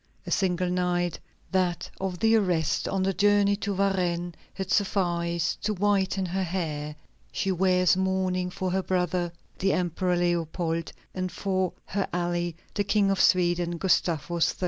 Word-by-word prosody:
A - - -6
single 180 -2 +1
night, 175 -2 0 0.3
that 180 -2 0
of 190 -2 -2
the 225 +3 +4
arrest 180 -7 +1
on 195 -1 0
the 195 0 +1
journey 205 0 +3
to 200 -1 -2
Varennes, 180 -3 0 0.2
had 190 -1 -4
sufficed 170 -4 0
to 215 0 0
whiten 195 -1 +1
her 185 +2 -2
hair. 155 -5 -3 0.4
She 195 - -1
wears 180 0 +3
mourning 185 -1 0
for 185 0 -3
her 190 +1 +1
brother, 180 -1 0 0.3
the 195 +1 +2
Emperor 180 0 0
Leopold, 170 -1 -1 0.2
and 185 -1 -3
for 190 -2 -1
her 200 0 -2
ally, 175 0 -1 0.2
the 205 - 0
King 200 0 +2
of 195 - +1
Sweden, 175 -1 +3
Gustavus 170 -2 +1
III. - - -23
180 Hz, 150 wpm, -27 LUFS, 175-190 Hz, 0.4 s, the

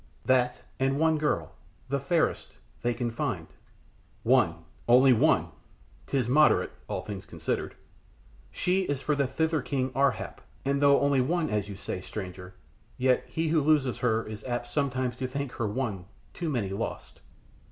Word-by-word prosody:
"That 125 -1 +2 0.2
and 135 +1 +1
one 160 -1 +3
girl 150 0 0 0.4
the 140 +1 0
fairest 160 +4 0 0.3
they 120 0 0
can 120 -2 -2
find." 115 - -2 0.8
"One - - +3 0.2
only 125 +2 +7
one! 110 - +3 0.6
'Tis 135 -3 +1
very 125 - 0
moderate, 150 +1 +5 0.2
all - - -3
things 100 -2 -7
considered." - - -3 0.7
"She 185 +2 +1
is 145 -4 -1
for 150 - +1
the 140 -2 +1
thither 160 +2 0
king, 130 -2 -1
Ar 135 +2 +4
hap, - - -7 0.2
and 140 +1 +1
though 140 -1 +5
only 140 -2 +3
one 160 +1 0
as 105 -1 -1
you 100 - -6
say, 95 -1 -5
stranger, 90 -2 -7 0.4
yet 130 -1 +2
he 160 0 -1
who 160 -1 +3
loses 145 -4 +2
her 115 -2 +1
is 110 -1 -7
apt 120 -1 -2
sometimes 130 -3 -1
to 130 - -2
think 140 0 -4
her 115 -3 -2
one 105 -5 -3 0.3
too 170 -2 -3
many 120 -9 -1
lost." 100 - -5
130 Hz, 165 wpm, -28 LUFS, 120-145 Hz, 0.8 s, only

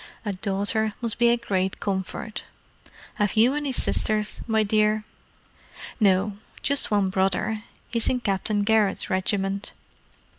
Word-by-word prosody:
A 205 - -1
daughter 205 +3 -1
must 230 -1 -3
be 240 0 +5
a 235 - +4
great 190 -5 -1
comfort. 200 +2 -3 0.7
Have 205 0 +1
you 235 +4 +5
any 290 -2 -2
sisters, 215 -4 +1
my 220 -1 +2
dear?" 215 +1 +2 1.0
"No. 200 -1 +2 0.3
Just 280 0 +1
one 205 -2 +2
brother—he's 210 +4 -1
in 250 - +1
Captain 205 0 0
Garrett's 215 -1 +2
regiment." 195 +1 -1
210 Hz, 120 wpm, -25 LUFS, 195-220 Hz, 1.0 s, be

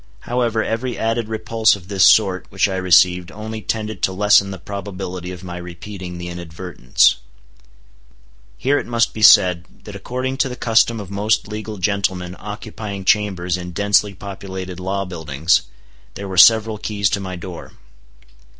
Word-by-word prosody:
However, 120 -2 -1
every 120 +2 -3
added 115 0 -1
repulse 110 0 +2
of 95 -3 -13
this 95 -2 +1
sort 95 -4 +4
which 95 +1 +1
I 95 - -3
received 90 0 +3
only 110 +1 -7
tended 110 +3 -4
to - - +1
lessen 100 +1 +4
the 95 - -6
probability 95 -2 -6
of 90 0 -9
my 90 -1 -7
repeating 90 +1 -8
the 85 0 -6
inadvertence. 85 -7 0 1.4
Here 145 +2 +1
it - - -7
must 115 -1 +1
be 110 - -7
said, 90 -3 +6 0.2
that 105 - -10
according 130 +6 -4
to 135 - +1
the 125 - -6
custom 115 -1 +2
of 100 -2 -8
most 105 +2 0
legal 105 0 -6
gentlemen 95 -2 -1
occupying 105 -1 -7
chambers 95 -4 +1
in 90 0 -7
densely 100 +1 +2
populated 95 -2 -7
law 100 +2 -2
buildings, 80 -4 0 0.5
there 100 - -6
were 95 - -5
several 110 +2 +6
keys 105 -2 -1
to - - 0
my 95 -2 -6
door. 85 0 -9
100 Hz, 160 wpm, -20 LUFS, 90-110 Hz, 1.4 s, said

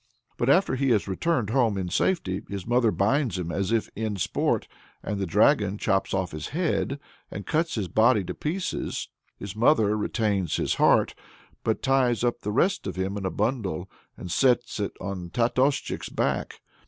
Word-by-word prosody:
But 120 - 0
after 185 +2 +4
he 135 +1 +1
has 110 -5 +2
returned 110 - 0
home 115 -5 +2
in 90 -2 -2
safety, 95 - 0
his 100 -2 -5
mother 120 -1 +3
binds 115 +3 +1
him 85 -2 -3
as 100 +3 -1
if 115 -2 +1
in 110 -1 -2
sport, 95 - 0 0.4
and 105 - -3
the 95 - -1
dragon 105 - +3
chops 95 -2 0
off 95 -2 -1
his 75 - -5
head 155 -4 -1 0.3
and 100 - -7
cuts 165 +1 0
his 105 -5 -2
body 110 +3 +3
to - - -5
pieces. 175 +5 -3 0.3
His 100 0 -7
mother 110 -3 +3
retains 105 -5 0
his - - 0
heart, - - +4 0.5
but 110 - -1
ties 130 -4 +2
up 120 0 +1
the 105 - -3
rest 180 - +1
of - - -4
him 95 +2 -2
in 100 -2 -2
a - - 0
bundle, 100 -5 -2 0.3
and 90 - -7
sets 120 +1 +2
it 100 - -2
on 90 -2 -5
Tatoschik's 125 +6 0
back. - - -2
110 Hz, 180 wpm, -26 LUFS, 95-130 Hz, 0.5 s, after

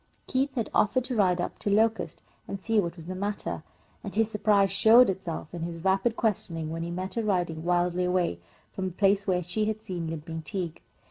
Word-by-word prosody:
Keith 270 +1 0
had 230 -4 -2
offered 250 +4 +3
to 255 0 -3
ride 185 -4 +3
up 175 - -3
to - - -1
Locust 215 -5 +1 0.2
and 195 - -4
see 225 +2 +1
what 170 -3 -1
was 165 -3 -11
the 185 - -4
matter, 200 +2 -3 0.4
and 200 - -6
his 225 0 +2
surprise 205 -2 +3
showed 220 +3 +7
itself 180 -4 -6
in 170 - -5
his 170 0 -4
rapid 195 +4 +2
questioning 165 -9 -1
when 165 0 -4
he 170 - -3
met 185 +2 -4
her 230 - -1
riding 175 -6 0
wildly 175 +1 +1
away 180 - +1 0.3
from 190 - -3
the 185 - -5
place 200 0 +3
where 180 -1 +1
she 195 +6 -1
had 215 0 -2
seen 180 -6 -4
Limping 160 0 -5
Tige. 170 -1 -4
190 Hz, 210 wpm, -28 LUFS, 175-215 Hz, 0.4 s, showed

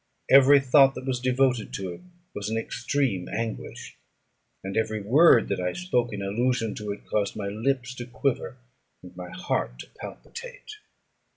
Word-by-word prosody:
Every 140 +1 +8
thought 135 0 +5
that - - -7
was 130 -2 -1
devoted 125 -2 +1
to 95 -2 -4
it - - -12 0.3
was 105 0 -4
an 110 - -1
extreme 120 -5 -1
anguish, 115 -1 -5 0.7
and 95 0 -5
every 110 -1 0
word 120 +3 +5
that 100 - -1
I 90 0 -1
spoke 125 -10 -1
in 100 -2 -5
allusion 115 +2 0
to 105 -1 -5
it 100 - -8
caused 100 -2 -1
my 100 -1 -3
lips 125 +4 -1
to 120 - -6
quiver, 130 +1 -2 0.5
and 90 -1 -13
my 90 0 -8
heart - - -2
to - - -10
palpitate. 470 -2 -9
120 Hz, 165 wpm, -26 LUFS, 100-135 Hz, 0.7 s, Every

